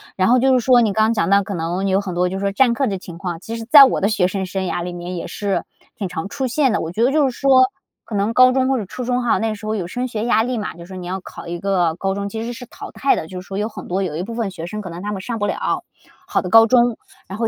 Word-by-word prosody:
然 185 Hz, +1 st, +2 dB
后 250 Hz, -, +5 dB
就 265 Hz, +1 st, +3 dB
是 255 Hz, -, +4 dB
说 245 Hz, 0 st, +5 dB
你 215 Hz, -3 st, +1 dB
刚 220 Hz, +2 st, +2 dB
讲 170 Hz, -6 st, 0 dB
到 200 Hz, 0 st, +4 dB
可 200 Hz, -, -5 dB
能 175 Hz, +4 st, -2 dB
有 190 Hz, 0 st, +2 dB
很 190 Hz, -3 st, -5 dB
多 180 Hz, +1 st, +1 dB
就 190 Hz, +1 st, -4 dB
是 200 Hz, 0 st, -1 dB
占 245 Hz, +2 st, +4 dB
课 270 Hz, +3 st, 0 dB
的 195 Hz, -3 st, -2 dB
情 175 Hz, -2 st, -10 dB
况， 175 Hz, -2 st, -5 dB
其 225 Hz, +4 st, -6 dB
实 225 Hz, -, -7 dB
在 285 Hz, 0 st, +10 dB
我 260 Hz, -, 0 dB
的 195 Hz, -, +3 dB
学 195 Hz, -4 st, +2 dB
生 190 Hz, +1 st, -3 dB
生 190 Hz, +1 st, -3 dB
涯 175 Hz, -, -2 dB
里 180 Hz, 0 st, -5 dB
面 175 Hz, +1 st, -6 dB
也 170 Hz, -, -5 dB
是 200 Hz, -2 st, -2 dB, 0.3 s
挺 210 Hz, -6 st, -4 dB
常 175 Hz, +1 st, -5 dB
出 265 Hz, +4 st, -3 dB
现 265 Hz, +1 st, +2 dB
的， -, -, 0 dB
我 165 Hz, -, -4 dB
觉 220 Hz, +6 st, 0 dB
得 255 Hz, -, +3 dB
就 290 Hz, -2 st, +3 dB
是 245 Hz, -, -9 dB
说 265 Hz, -2 st, +6 dB, 0.4 s
可 -, -, -11 dB
能 205 Hz, +3 st, 0 dB
高 255 Hz, +1 st, +6 dB
中 260 Hz, 0 st, +1 dB
或 270 Hz, -, +2 dB
者 215 Hz, -, -3 dB
初 250 Hz, +7 st, -7 dB
中 250 Hz, 0 st, 0 dB
哈， 240 Hz, -, +2 dB
那 220 Hz, -1 st, -1 dB
时 215 Hz, +1 st, -11 dB
候 215 Hz, -, -1 dB
有 185 Hz, -5 st, -3 dB
升 245 Hz, +7 st, -3 dB
学 225 Hz, -2 st, -3 dB
压 225 Hz, -2 st, +3 dB
力 250 Hz, +1 st, -2 dB
嘛， 210 Hz, -, -4 dB
就 170 Hz, -, -14 dB
是 170 Hz, -, -10 dB
说 190 Hz, 0 st, -9 dB
你 180 Hz, -1 st, -7 dB
要 190 Hz, +2 st, -3 dB
考 -, -, -10 dB
一 170 Hz, 0 st, -4 dB
个 180 Hz, -4 st, +1 dB
高 195 Hz, +2 st, -2 dB
中， 200 Hz, +1 st, -4 dB
其 220 Hz, +2 st, -5 dB
实 240 Hz, +1 st, -4 dB
是 245 Hz, +1 st, -9 dB
淘 -, -, -10 dB
汰 275 Hz, -, +1 dB
的， -, -, -5 dB
就 180 Hz, +1 st, -7 dB
是 185 Hz, -, -16 dB
说 195 Hz, -, -5 dB
有 210 Hz, +1 st, -1 dB
很 230 Hz, -, -9 dB
多 190 Hz, +2 st, -1 dB
有 165 Hz, -5 st, -3 dB
一 165 Hz, -, -3 dB
部 230 Hz, +4 st, -6 dB
分 225 Hz, -4 st, -2 dB
学 170 Hz, -3 st, -7 dB
生 210 Hz, +4 st, -5 dB
可 190 Hz, -, -7 dB
能 170 Hz, +1 st, -7 dB
他 205 Hz, +2 st, -4 dB
们 195 Hz, -2 st, -4 dB
上 230 Hz, +3 st, -4 dB
不 205 Hz, -, 0 dB
了 -, -, -2 dB, 0.4 s
好 -, -, 0 dB
的 180 Hz, -, -5 dB
高 225 Hz, +4 st, +8 dB
中， 240 Hz, -1 st, +3 dB, 0.3 s
然 190 Hz, -, -7 dB
后 230 Hz, 0 st, 0 dB
205 Hz, 355 characters per minute, -20 LUFS, 185-240 Hz, 0.4 s, 在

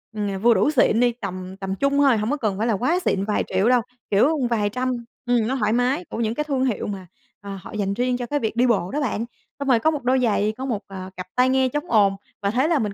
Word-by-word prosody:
ừm, 200 Hz, -2 st, -2 dB
vừa 235 Hz, +1 st, +6 dB
đủ 290 Hz, -, +2 dB
xịn 240 Hz, -5 st, +3 dB
đi 245 Hz, 0 st, +4 dB
tầm 185 Hz, -5 st, -7 dB
tầm 195 Hz, -1 st, -4 dB
trung 280 Hz, +6 st, +1 dB
thôi, 275 Hz, -5 st, +4 dB
hổng 215 Hz, +5 st, -1 dB
có 295 Hz, -, 0 dB
cần 210 Hz, -7 st, -1 dB
phải 220 Hz, -, 0 dB
là 225 Hz, -, +2 dB
quá 280 Hz, -, +1 dB
xịn 195 Hz, -, +1 dB
vài 210 Hz, 0 st, 0 dB
triệu 190 Hz, +5 st, +1 dB
đâu, 250 Hz, -1 st, +4 dB, 0.3 s
kiểu, 270 Hz, +11 st, +3 dB
vài 210 Hz, -3 st, +1 dB
trăm, 255 Hz, +4 st, -2 dB, 0.3 s
ừm, 240 Hz, -2 st, +2 dB
nó 265 Hz, -, 0 dB
thoải 215 Hz, -4 st, +1 dB
mái 255 Hz, +8 st, +1 dB
của -, -, -6 dB
những 225 Hz, 0 st, -1 dB
cái 300 Hz, -, -1 dB
thương 275 Hz, -3 st, 0 dB
hiệu 240 Hz, -6 st, -1 dB
mà, 195 Hz, -3 st, -6 dB, 0.3 s
à, 200 Hz, -1 st, -7 dB
họ -, -, -10 dB
dành 200 Hz, -2 st, -1 dB
riêng 245 Hz, +3 st, 0 dB
cho 245 Hz, -, -4 dB
cái 290 Hz, +5 st, -1 dB
việc 225 Hz, -3 st, -2 dB
đi 245 Hz, +2 st, +3 dB
bộ 195 Hz, -6 st, +1 dB
đó 300 Hz, -, -1 dB
bạn. 230 Hz, -4 st, -1 dB, 0.3 s
Xong 280 Hz, -, -3 dB
rồi 250 Hz, -4 st, +4 dB
có 315 Hz, +7 st, +2 dB
một 295 Hz, -3 st, -4 dB
đôi 255 Hz, +1 st, +2 dB
giày, 215 Hz, -3 st, +1 dB
có 260 Hz, -, -4 dB
một, 230 Hz, -6 st, -2 dB
ờ, 190 Hz, -1 st, -7 dB
cặp 185 Hz, 0 st, -6 dB
tai 255 Hz, +1 st, +4 dB
nghe 260 Hz, 0 st, +3 dB
chống 295 Hz, +3 st, -4 dB
ồn 200 Hz, -3 st, +4 dB, 0.3 s
và 200 Hz, 0 st, 0 dB
thế 255 Hz, +6 st, +2 dB
là 330 Hz, -3 st, +2 dB
mình 210 Hz, -4 st, -2 dB
235 Hz, 285 wpm, -23 LUFS, 205-260 Hz, 0.3 s, vừa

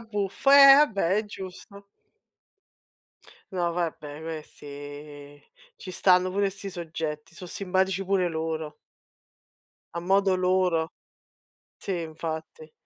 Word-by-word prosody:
buffo. 210 Hz, +3 st, -1 dB
Eh, 275 Hz, -1 st, +10 dB
vabbè 200 Hz, -, +3 dB
è 215 Hz, -, 0 dB
giusto. 200 Hz, +1 st, -10 dB, 1.7 s
No 175 Hz, -2 st, 0 dB
vabbè 160 Hz, -3 st, -4 dB
questi 145 Hz, -2 st, -9 dB, 0.4 s
ci 185 Hz, -, -9 dB
stanno 185 Hz, 0 st, +3 dB
pure 200 Hz, 0 st, +1 dB
'sti 200 Hz, +1 st, -7 dB
soggetti, 160 Hz, -3 st, -5 dB
so' 180 Hz, -, -9 dB
simpatici 190 Hz, +1 st, -1 dB
pure 185 Hz, -2 st, +1 dB
loro 160 Hz, -1 st, -4 dB, 1.2 s
a 170 Hz, -, -3 dB
modo 190 Hz, +1 st, +2 dB
loro. 180 Hz, -3 st, +1 dB, 0.9 s
Sì, 185 Hz, -3 st, -3 dB
infatti. 160 Hz, -1 st, -6 dB
180 Hz, 105 wpm, -26 LUFS, 160-195 Hz, 1.7 s, Eh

